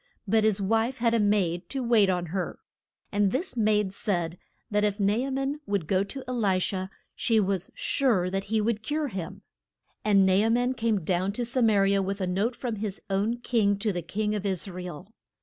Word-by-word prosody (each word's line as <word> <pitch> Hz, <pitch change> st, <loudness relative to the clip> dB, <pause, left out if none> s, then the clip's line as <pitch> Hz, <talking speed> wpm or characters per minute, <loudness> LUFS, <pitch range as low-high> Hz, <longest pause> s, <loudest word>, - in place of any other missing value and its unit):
But 220 Hz, +2 st, +3 dB
his 215 Hz, -2 st, +2 dB
wife 225 Hz, +6 st, +1 dB
had 230 Hz, -1 st, +2 dB
a 230 Hz, -, +3 dB
maid 190 Hz, -4 st, +1 dB
to 270 Hz, -2 st, -2 dB
wait 225 Hz, -5 st, +4 dB
on 180 Hz, -1 st, 0 dB
her. 190 Hz, -2 st, -2 dB, 0.5 s
And 205 Hz, -1 st, +2 dB
this 300 Hz, +3 st, -2 dB
maid 210 Hz, -3 st, +2 dB
said 175 Hz, -4 st, -2 dB, 0.3 s
that 210 Hz, 0 st, +2 dB
if 205 Hz, 0 st, 0 dB
Na 200 Hz, 0 st, +3 dB
a 250 Hz, +5 st, -1 dB
man 270 Hz, +2 st, -2 dB
would 200 Hz, -5 st, 0 dB
go 190 Hz, +3 st, +2 dB
to 265 Hz, +7 st, -6 dB
E -, -, -3 dB
li 205 Hz, -7 st, +1 dB
sha 185 Hz, 0 st, -2 dB, 0.3 s
she 230 Hz, -2 st, +2 dB
was 195 Hz, -2 st, 0 dB
sure 225 Hz, -10 st, +1 dB
that 195 Hz, 0 st, -2 dB
he 220 Hz, +2 st, 0 dB
would 215 Hz, 0 st, 0 dB
cure 295 Hz, +5 st, -2 dB
him. 195 Hz, -1 st, -6 dB, 0.6 s
And 200 Hz, -2 st, +4 dB
Na 190 Hz, -, +4 dB
a 210 Hz, +4 st, +3 dB
man 245 Hz, +2 st, +2 dB
came 225 Hz, -5 st, 0 dB
down 185 Hz, +4 st, 0 dB
to 240 Hz, +3 st, -2 dB
Sa 250 Hz, +2 st, -1 dB
ma 220 Hz, -2 st, +4 dB
ri 195 Hz, 0 st, +3 dB
a 195 Hz, -, +2 dB
with 195 Hz, +1 st, -3 dB
a 190 Hz, -, 0 dB
note 200 Hz, +7 st, 0 dB
from 240 Hz, -4 st, -4 dB
his 205 Hz, -1 st, -4 dB
own 205 Hz, +5 st, +1 dB
king 210 Hz, -5 st, +2 dB
to 205 Hz, 0 st, -1 dB
the 175 Hz, -, -2 dB
king 210 Hz, +5 st, -2 dB
of 210 Hz, -2 st, -2 dB
Is 195 Hz, -2 st, -2 dB
ra 180 Hz, -1 st, -6 dB
el. 180 Hz, +4 st, -8 dB
205 Hz, 225 wpm, -27 LUFS, 190-230 Hz, 0.6 s, wait